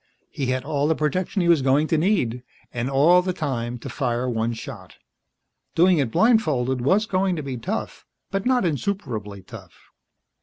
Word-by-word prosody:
He 135 - -3
had 130 0 -1
all 145 0 0
the 160 - +2
protection 180 +5 -1
he - - +1
was 170 -4 +5
going 135 +3 +3
to - - +2
need. 155 - +1 0.3
And 120 +1 -2
all 155 +7 +5
the 185 0 -2
time 125 -8 -3
to 115 - -9
fire 125 -2 -2
one 115 -1 -1
shot. 110 - -9 0.8
Doing 175 0 +4
it 135 -5 +1
blindfolded 150 - +2
was 190 - +2
going 190 -2 0
to 155 - -4
be 135 -2 -4
tough, 115 - -5 0.3
but 195 0 -1
not 250 -4 +2
insuperably 120 - -3
tough. - - -14
145 Hz, 175 wpm, -23 LUFS, 125-180 Hz, 0.8 s, was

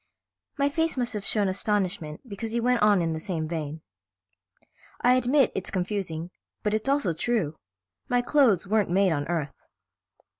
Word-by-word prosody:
My 280 0 +3
face 320 +1 0
must 245 -1 0
have 210 -2 -4
shown 205 0 +1
astonishment 185 - -2
because 220 +1 -5
he 235 - +1
went 245 +1 +2
on 205 -4 +4
in 165 -1 0
the 160 - -3
same 160 -2 -3
vein. 155 -1 -4 1.2
"I 245 - +4
admit 255 +2 +3
it's 190 - -3
confusing, 180 -3 -3 0.3
but 210 - 0
it's 220 +5 -1
also 275 -11 +2
true. 175 -4 -1 0.5
My 245 0 +2
clothes 240 - +3
weren't 210 0 +1
made 190 +1 +3
on 145 -2 -1
Earth." 160 -4 -4
200 Hz, 160 wpm, -26 LUFS, 170-240 Hz, 1.2 s, on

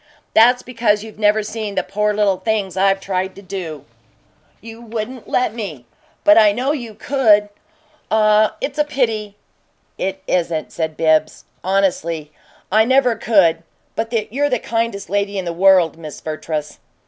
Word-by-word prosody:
"That's 245 +3 +5
because 230 -4 0
you've 220 -1 -12
never 210 0 +3
seen 215 -1 -5
the 190 - 0
poor 210 +3 0
little 205 -2 +1
things 195 -1 -2
I've 195 0 +2
tried 190 -1 -3
to 200 - -12
do." 165 -7 -6 0.7
"You 225 +1 -11
wouldn't 235 +2 -6
let 250 - 0
me, 180 - -6 0.4
but 310 -5 +7
I 210 -2 +5
KNOW 255 +6 -1
you 240 -7 -5
could! 215 -7 +3 0.6
Ah, 215 0 +3
it's 280 +1 -4
a - - +5
pity!" 225 -8 -2 0.6
"It 190 0 -3
isn't," 165 -3 -1
said 160 -2 -3
BIBBS, 155 -1 +1 0.2
honestly. 170 -5 0 0.4
"I 215 +2 +5
never 255 0 +3
could 180 -9 +3 0.3
but 225 +1 -3 0.2
you're 290 +2 +1
the 250 - +1
kindest 225 -3 -2
lady 200 0 -1
in 190 - -3
this 170 - -3
world, 180 -3 +4
Miss 155 -3 -8
Vertrees." 155 -1 -5
205 Hz, 155 wpm, -19 LUFS, 185-225 Hz, 0.7 s, but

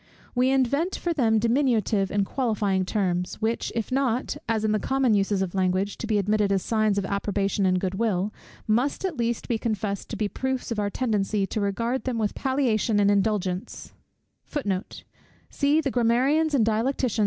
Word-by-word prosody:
We 250 +1 +2
invent 275 +7 +1
for 345 - -2
them 230 -7 +2
diminutive 230 -4 +2
and 200 -1 +1
qualifying 205 -6 0
terms, 180 -3 -1
which, 225 +1 -1
if 230 0 -2
not, 255 -2 0
as 220 -1 +1
in 215 - +2
the 215 - +1
common 265 0 +1
uses 200 -1 +1
of 180 - -5
language, 190 +1 0
to 230 - -4
be 215 -2 +2
admitted 205 0 +1
as 195 -2 +1
signs 215 -2 +1
of 200 - 0
approbation 200 0 0
and 185 0 +2
good 185 0 -2
will, 205 -1 0 0.3
must 245 - +1
at 365 -4 -2
least 235 -2 -2
be 230 -2 0
confessed 210 -3 -3
to - - -4
be 210 0 0
proofs 260 +3 -3
of 225 - -1
our 205 -1 0
tendency 210 -3 0
to 215 +2 -3
regard 230 +6 -1
them 255 -3 -1
with 215 -2 0
palliation 245 -5 +1
and 200 0 +4
indulgence. 195 -3 -1
215 Hz, 160 wpm, -25 LUFS, 200-240 Hz, 0.3 s, and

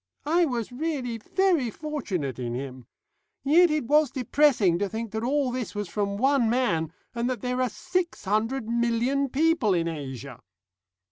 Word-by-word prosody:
I 335 +3 +3
was 245 -5 -3
really 255 -4 -3
very 345 - +1
fortunate 200 - -4
in 120 -1 -3
him. 130 -1 -7 0.6
Yet 335 +5 +5
it 305 -4 0
was 300 +2 +4
depressing 250 - +3
to 200 0 -1
think 225 +1 -4
that 220 0 -3
all 270 +1 +1
this 245 -4 -4
was 205 -1 -3
from 200 0 -2
one 265 -1 +3
man, 170 -11 +1 0.2
and 235 +1 -1
that 250 -5 -3
there 250 0 -1
are 255 - +1
six 355 - -3
hundred 220 +5 0
million 235 +4 +1
people 280 - +2
in 170 -1 0
Asia." 135 -5 -6
240 Hz, 160 wpm, -26 LUFS, 200-280 Hz, 0.6 s, Yet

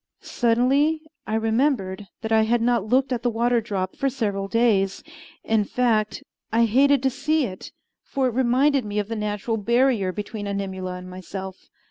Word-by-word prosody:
Suddenly 270 +7 +2 0.2
I 215 - -1
remembered 220 -4 0 0.2
that 220 - -3
I 220 0 +5
had 230 +2 +2
not 235 -2 +2
looked 260 +3 +2
at 240 - -2
the 245 - +1
water 235 +1 +1
drop 195 -4 -3
for 275 - 0
several 205 -7 -2
days. 200 -4 +1 0.4
In 220 -1 +2
fact, 220 -1 0 0.3
I 230 +1 +4
hated 275 +4 +3
to 265 - +2
see 290 +3 0
it; 185 -4 -8 0.3
for 270 -1 -1
it 250 - 0
reminded 260 +3 +2
me 210 0 -5
of 210 0 -1
the 225 - -2
natural 210 +1 -2
barrier 235 -2 +2
between 205 +1 -5
Animula 190 -2 -4
and 180 0 -9
myself. 190 +1 -8
225 Hz, 170 wpm, -24 LUFS, 200-250 Hz, 0.4 s, I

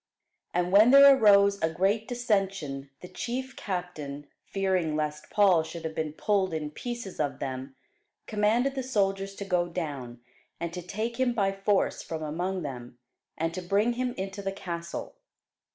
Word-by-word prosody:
And 180 +1 0
when 210 +4 +7
there 275 +1 +9
arose 200 -4 +5
a 160 - +2
great 195 +7 +1
dissension, 195 - -1
the 180 - -8
chief 260 +7 -4
captain, 155 -7 -5 0.2
fearing 185 -5 0
lest 150 0 -3
Paul 195 -5 +5
should 160 +1 -7
have 160 - -3
been 155 -1 -3
pulled 190 -1 +1
in 150 -1 -3
pieces 235 +1 -6
of 145 -2 -1
them, 130 0 -5 0.5
commanded 220 +6 +1
the 270 - -2
soldiers 195 -5 0
to 200 - -6
go 180 -2 +1
down, 140 -9 -5 0.4
and 170 0 -4
to 180 - -4
take 220 +7 -4
him 255 -2 +2
by 200 -4 +1
force 195 0 +1
from 160 -1 -5
among 175 +4 -2
them, 125 -4 -7 0.4
and 165 +1 -1
to 185 - -4
bring 200 +6 +2
him 245 0 -2
into 195 +1 -4
the 195 0 -2
castle. 170 -3 -6
190 Hz, 165 wpm, -28 LUFS, 160-210 Hz, 0.5 s, there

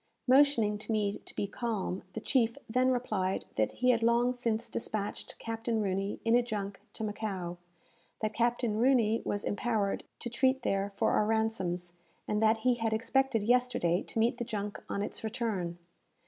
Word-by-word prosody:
Motioning 250 -6 +5
to 215 - -5
me 210 -2 0
to - - -9
be - - 0
calm, 200 -3 -3
the - - -3
chief 235 -1 +2
then 255 +3 +2
replied 215 -7 0
that 110 -1 +1
he 250 0 +3
had 230 -2 +1
long 235 +2 +3
since 235 -2 -1
despatched 215 -3 -4
Captain 225 0 -2
Rooney 195 0 -1
in 230 - +3
a 245 - +6
junk 205 -4 -4
to - - -5
Macao; 195 -5 -3 0.6
that 215 -1 -1
Captain 235 -2 +1
Rooney 230 -3 +3
was 205 - -2
empowered 205 -2 0
to - - -5
treat 260 +2 +1
there 195 -1 0
for - - +2
our 210 - +3
ransoms; 185 -6 -1 0.3
and 210 0 0
that 220 0 +4
he 250 - +5
had 225 -2 -1
expected 245 0 +1
yesterday 245 -7 +2
to - - -8
meet 235 +3 +2
the - - 0
junk 210 -3 -4
on 200 - -1
its - - -5
return. 215 -7 -2
220 Hz, 175 wpm, -31 LUFS, 205-240 Hz, 0.6 s, a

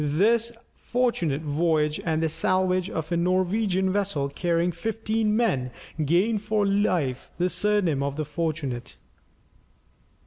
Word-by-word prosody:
This 215 +11 +2 0.2
fortunate 175 - -1
voyage 150 0 +1
and 160 -1 0
the - - +3
salvage 185 +3 +1
of 160 -2 -4
a 170 - +2
Norwegian 185 +2 +1
vessel 195 -9 -1
carrying 170 +3 0
fifteen 220 +4 -1
men, 160 - +1 0.3
gained 190 +8 +2
for 210 -1 0
Leif 180 -10 0
the 180 +1 +1
surname 195 -9 +1
of 140 0 -2
the 155 0 -2
Fortunate. 145 -5 -3
175 Hz, 125 wpm, -25 LUFS, 155-205 Hz, 0.3 s, the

